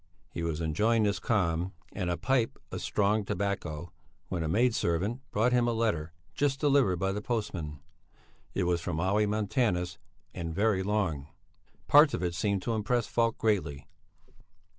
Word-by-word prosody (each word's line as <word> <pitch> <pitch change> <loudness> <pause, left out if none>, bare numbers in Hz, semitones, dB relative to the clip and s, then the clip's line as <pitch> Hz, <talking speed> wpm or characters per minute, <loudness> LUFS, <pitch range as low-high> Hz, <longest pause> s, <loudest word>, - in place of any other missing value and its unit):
He 85 - -5
was 85 -1 -2
enjoying 105 +9 +2
this 100 -1 +1
calm 90 -4 0 0.2
and 90 -3 -2
a 85 - 0
pipe 125 +4 +1
of - - -4
strong 105 +1 +1
tobacco, 95 -5 -3 0.4
when 90 -3 -2
a 80 - -1
maid 115 +9 +3
servant 100 +8 0
brought 115 +4 +2
him 120 -1 +3
a 120 - +1
letter 105 -9 0 0.2
just 135 +6 0
delivered 140 -10 +3
by 95 +2 0
the 105 +1 -3
postman. 90 - -3 0.7
It 95 - +1
was 85 -1 +1
from 85 -2 -3
Olle 100 +4 +2
Montanus 105 -3 0 0.3
and 85 -2 -5
very 100 -1 +2
long. 95 -8 -1 0.6
Parts 145 +1 +7
of - - -4
it 90 -1 -1
seemed 95 +2 0
to 115 - -1
impress 110 +2 0
Falk 115 -1 +1
greatly. 95 -10 0
100 Hz, 160 wpm, -29 LUFS, 85-115 Hz, 0.7 s, Parts